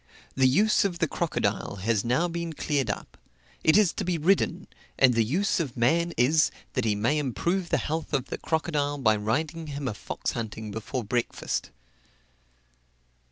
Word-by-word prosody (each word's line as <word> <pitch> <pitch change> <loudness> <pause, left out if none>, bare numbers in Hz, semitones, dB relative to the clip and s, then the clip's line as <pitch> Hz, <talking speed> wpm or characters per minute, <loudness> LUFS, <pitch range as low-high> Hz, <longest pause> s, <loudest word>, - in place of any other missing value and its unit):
The 130 -1 +4
use 210 +12 +4
of 190 -4 -1
the 165 - +1
crocodile 140 - -1
has 105 +1 0
now 130 +9 +1
been 170 -1 -4
cleared 140 -5 -1
up 105 - -5 0.4
it 155 - +5
is 205 -5 +4
to - - -3
be 180 -2 0
ridden; 180 +2 +1 0.3
and 130 -2 +5
the 115 -1 +3
use 175 - +1
of 135 -7 -3
man 165 +9 +2
is, 150 +6 +4 0.2
that 125 -3 0
he 105 -2 +2
may 120 +9 +1
improve 170 +7 -1
the - - +2
health 160 +1 -3
of 140 -4 0
the - - -4
crocodile 150 -3 -1
by 110 -6 +3
riding 150 +10 -2
him 140 -2 -4
a 120 - -1
fox - - -4
hunting 110 -1 -5
before 115 +4 -4
breakfast. 120 +3 -2
145 Hz, 170 wpm, -27 LUFS, 115-165 Hz, 0.4 s, it